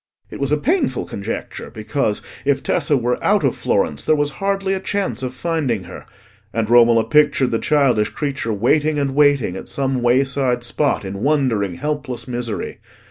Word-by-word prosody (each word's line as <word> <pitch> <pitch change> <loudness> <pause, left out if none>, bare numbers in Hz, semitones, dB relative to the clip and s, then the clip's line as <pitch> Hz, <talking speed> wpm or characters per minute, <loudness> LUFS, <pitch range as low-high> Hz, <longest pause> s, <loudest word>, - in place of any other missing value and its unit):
It - - -8
was 140 0 0
a 150 - +3
painful 295 - 0
conjecture, 100 +3 -6
because, 110 0 -2 0.2
if 140 -1 +1
Tessa 150 -4 +1
were 125 0 -1
out - - +3
of - - +1
Florence, 75 0 0
there 155 - +3
was 145 0 0
hardly 195 -1 0
a 190 - -1
chance 200 -3 -2
of 130 -1 -3
finding 130 - -1
her, 90 +1 -11 0.4
and 115 -2 -1
Romola 115 -1 +5
pictured 150 -3 +3
the 115 - 0
childish 135 -8 +2
creature 140 -6 -3
waiting 150 +8 +2
and 140 -2 0
waiting 140 -9 +3
at - - -7
some 135 -2 -1
wayside 125 0 +1
spot 135 -2 0
in 100 +1 -5
wondering, 120 - +1
helpless 145 - -4
misery. 120 -3 -4
135 Hz, 170 wpm, -20 LUFS, 115-150 Hz, 0.4 s, Romola